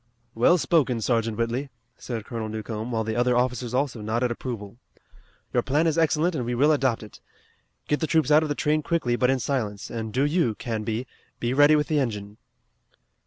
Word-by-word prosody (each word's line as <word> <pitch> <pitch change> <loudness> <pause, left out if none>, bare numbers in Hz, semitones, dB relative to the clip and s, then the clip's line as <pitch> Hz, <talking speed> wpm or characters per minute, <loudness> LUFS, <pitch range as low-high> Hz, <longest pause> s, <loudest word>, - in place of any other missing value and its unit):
"Well 125 +10 +4
spoken, 145 -8 +2
Sergeant 115 -1 0
Whitley," 120 +4 -1 0.3
said 115 -4 -6
Colonel 115 -2 -4
Newcomb, 110 +1 -5
while 110 -1 0
the 110 0 -3
other 120 0 +2
officers 125 -1 0
also 130 -3 -1
nodded 120 +3 0
approval. 115 -4 -6 0.8
"Your - - +3
plan 150 +5 +1
is 160 -2 +2
excellent 165 +1 +2
and 135 -6 -2
we 120 +1 -2
will 145 +5 +4
adopt 130 -7 +1
it. 105 - -13 0.7
Get 150 - +1
the 160 - -1
troops 155 -3 +2
out 150 +1 +7
of 155 - -2
the 145 - -1
train 150 +2 +1
quickly 150 -7 0
but 125 +1 +2
in 135 - +3
silence 110 -7 -3
and 110 -2 -4
do 130 +5 +1
you, 145 -7 +1
Canby, 110 +1 -3 0.3
be 120 +1 -1
ready 145 +2 +6
with 150 0 +2
the 150 0 +1
engine." 105 -5 -3
125 Hz, 195 wpm, -25 LUFS, 115-145 Hz, 0.8 s, out